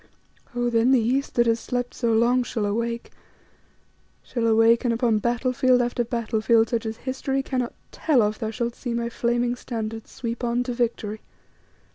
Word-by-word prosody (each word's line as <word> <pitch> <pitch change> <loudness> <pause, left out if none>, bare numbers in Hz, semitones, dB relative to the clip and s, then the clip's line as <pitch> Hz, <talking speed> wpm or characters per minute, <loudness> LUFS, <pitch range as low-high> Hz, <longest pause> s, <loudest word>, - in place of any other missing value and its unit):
Oh! 240 0 0
then 230 +2 +3
the 260 - +5
East, 255 +5 0
that 240 - +4
has 230 0 +2
slept 245 0 -3
so 235 -3 0
long, 235 +3 +3
shall 230 -3 -2
awake 235 +3 -2 1.1
shall 235 -2 -1
awake, 225 +2 +4
and 245 - +2
upon 230 -2 +2
battlefield 250 +2 +2
after 240 0 0
battlefield 230 -1 +1
such 230 -2 -1
as 220 0 -4
history 265 +1 -2
cannot 255 -3 -2 0.2
tell 275 -8 +2
of, 210 +1 -1
thou 220 -3 -2
shalt 235 +1 -2
see 240 -1 -4
my 235 0 -1
flaming 240 +1 0
standards 225 -2 -5
sweep 235 0 -5
on 240 +1 +1
to 250 -1 -3
victory. 225 -3 -2
235 Hz, 170 wpm, -24 LUFS, 225-245 Hz, 1.1 s, the